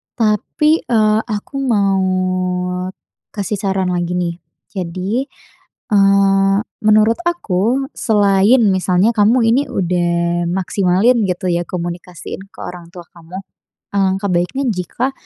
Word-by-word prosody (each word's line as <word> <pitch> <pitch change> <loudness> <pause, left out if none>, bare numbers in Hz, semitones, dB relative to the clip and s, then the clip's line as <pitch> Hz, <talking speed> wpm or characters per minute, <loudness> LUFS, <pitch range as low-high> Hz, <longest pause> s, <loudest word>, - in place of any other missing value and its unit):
Tapi, 250 - +1
eee, 215 -2 +3
aku 215 +5 -4
mau 200 -7 +1 1.4
kasih 205 0 -3
saran 190 -2 -1
lagi 175 0 -2
nih. 175 -1 -2 0.4
Jadi, 190 +7 -3 0.6
eee, 195 -1 +4 0.3
menurut 215 +3 +4
aku 255 - 0
selain 205 +2 +3
misalnya 185 +3 +2
kamu 220 +4 +4
ini 235 +5 +3
udah 175 -2 0
maksimalin 190 +5 +1
gitu 180 0 -2
ya, 170 0 0
komunikasiin 175 +1 -6
ke - - -17
orang 175 -1 -8
tua 175 - -8
kamu. 170 +2 -11 0.6
Alangkah 195 +1 +1
baiknya 180 +11 -1
jika 230 +6 -2
195 Hz, 110 wpm, -17 LUFS, 180-220 Hz, 1.4 s, eee